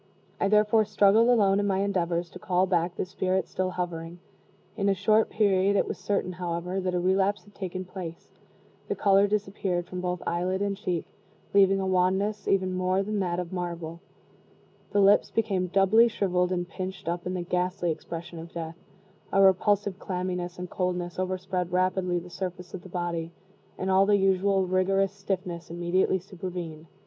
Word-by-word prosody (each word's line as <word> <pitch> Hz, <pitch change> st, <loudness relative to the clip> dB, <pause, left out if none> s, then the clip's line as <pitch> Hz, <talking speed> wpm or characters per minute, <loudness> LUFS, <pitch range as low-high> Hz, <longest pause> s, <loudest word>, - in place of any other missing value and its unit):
I -, -, +2 dB
therefore 210 Hz, +1 st, +4 dB
struggled 210 Hz, +2 st, +4 dB
alone 200 Hz, -5 st, +4 dB
in 205 Hz, -, 0 dB
my 195 Hz, -1 st, +1 dB
endeavors 175 Hz, -3 st, -1 dB
to 185 Hz, -, -10 dB
call 180 Hz, +1 st, +1 dB
back 175 Hz, -1 st, 0 dB
the -, -, -2 dB
spirit 185 Hz, 0 st, -1 dB
still 185 Hz, 0 st, -2 dB
hovering. 175 Hz, -2 st, -4 dB, 0.6 s
In 200 Hz, -1 st, +1 dB
a 195 Hz, -, +3 dB
short 215 Hz, +3 st, +3 dB
period 200 Hz, -2 st, +2 dB
it -, -, +2 dB
was -, -, -5 dB
certain, 200 Hz, -3 st, -1 dB
however, 175 Hz, +1 st, -3 dB
that 185 Hz, -1 st, -1 dB
a -, -, +1 dB
relapse 190 Hz, +3 st, +1 dB
had 205 Hz, -, -20 dB
taken 185 Hz, -1 st, -5 dB
place; 175 Hz, -3 st, -8 dB, 0.6 s
the -, -, -1 dB
color 200 Hz, 0 st, +4 dB
disappeared 195 Hz, -3 st, -1 dB
from 180 Hz, 0 st, -6 dB
both 180 Hz, -1 st, -3 dB
eyelid 180 Hz, +2 st, -1 dB
and 200 Hz, 0 st, -1 dB
cheek, 185 Hz, -5 st, -2 dB, 0.5 s
leaving 195 Hz, -1 st, +5 dB
a 190 Hz, -, -1 dB
wanness 190 Hz, +3 st, +1 dB
even 185 Hz, -1 st, +2 dB
more 185 Hz, +1 st, +1 dB
than 210 Hz, +1 st, -2 dB
that 175 Hz, -3 st, -1 dB
of 180 Hz, 0 st, -5 dB
marble; 170 Hz, -2 st, -5 dB, 0.9 s
the 205 Hz, -, +1 dB
lips 200 Hz, +1 st, +5 dB
became 195 Hz, -5 st, 0 dB
doubly 195 Hz, +5 st, +5 dB
shriveled 180 Hz, -5 st, 0 dB
and 175 Hz, -1 st, -1 dB
pinched 185 Hz, -1 st, -6 dB
up 175 Hz, +1 st, -2 dB
in 185 Hz, -, -2 dB
the 180 Hz, -, -2 dB
ghastly 180 Hz, 0 st, -1 dB
expression 170 Hz, +1 st, -7 dB
of 165 Hz, +1 st, -9 dB
death; 165 Hz, 0 st, -6 dB, 0.5 s
a 195 Hz, -, +2 dB
repulsive 195 Hz, +1 st, +3 dB
clamminess 180 Hz, -1 st, -3 dB
and 180 Hz, 0 st, -7 dB
coldness 180 Hz, -1 st, -2 dB
overspread 185 Hz, -1 st, -2 dB
rapidly 185 Hz, 0 st, +1 dB
the 175 Hz, +1 st, -5 dB
surface 180 Hz, 0 st, -6 dB
of 190 Hz, -, -6 dB
the 185 Hz, -, -12 dB
body; 170 Hz, -2 st, -3 dB, 0.5 s
and 190 Hz, 0 st, -1 dB
all 190 Hz, +1 st, +5 dB
the 205 Hz, -1 st, +5 dB
usual 195 Hz, 0 st, +2 dB
rigorous 190 Hz, +1 st, +2 dB
stiffness 185 Hz, -4 st, -4 dB
immediately 175 Hz, +3 st, +1 dB
supervened. 175 Hz, -3 st, -7 dB
185 Hz, 175 wpm, -27 LUFS, 175-195 Hz, 0.9 s, leaving